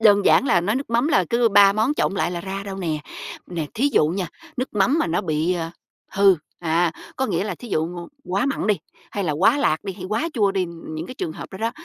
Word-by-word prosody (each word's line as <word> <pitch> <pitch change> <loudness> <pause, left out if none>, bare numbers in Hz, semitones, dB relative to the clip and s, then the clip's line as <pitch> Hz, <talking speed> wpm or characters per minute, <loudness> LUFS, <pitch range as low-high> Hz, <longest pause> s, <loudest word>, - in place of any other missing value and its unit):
đơn 205 -2 +5
giản 270 - +5
là 175 - +4
nói 205 +7 0
nước 270 -2 -4
mắm 235 +5 +2
là 190 - +3
cứ 235 0 +4
ba 200 -1 +7
món 220 +8 +1
trộn 195 - 0
lại 175 -2 0
là 175 -1 -3
ra 195 +2 -5
đâu 195 -1 -5
nè. 165 -5 -2 0.5
Nè, 165 -4 -3
thí 270 +6 +2
dụ 150 - +4
nha, 180 +1 -2 0.3
nước 255 +2 -1
mắm 210 +10 +3
mà - - +1
nó 165 +3 0
bị, 165 0 0
à, 165 -1 -3 0.4
hư, 195 -1 +6 0.2
à, 165 0 +1 0.2
có 265 - 0
nghĩa 185 -3 0
là 210 - -3
thí 240 - -11
dụ 155 - +1
ngôn 175 0 -7 0.2
quá 195 +7 0
mặn 275 - -1
đi, 210 - +4 0.4
hay 200 - -2
là 155 - 0
quá 195 - +3
lạt 155 - +1
đi, 195 - -3
hay 185 -1 -9
quá 225 - 0
chua 205 -5 +2
đi, 190 -2 +1
những 165 -1 -7
cái 255 - -8
trường 160 - -4
hợp - - -8
đó 190 - -7
đó 225 +2 0
195 Hz, 265 wpm, -23 LUFS, 170-220 Hz, 0.5 s, ba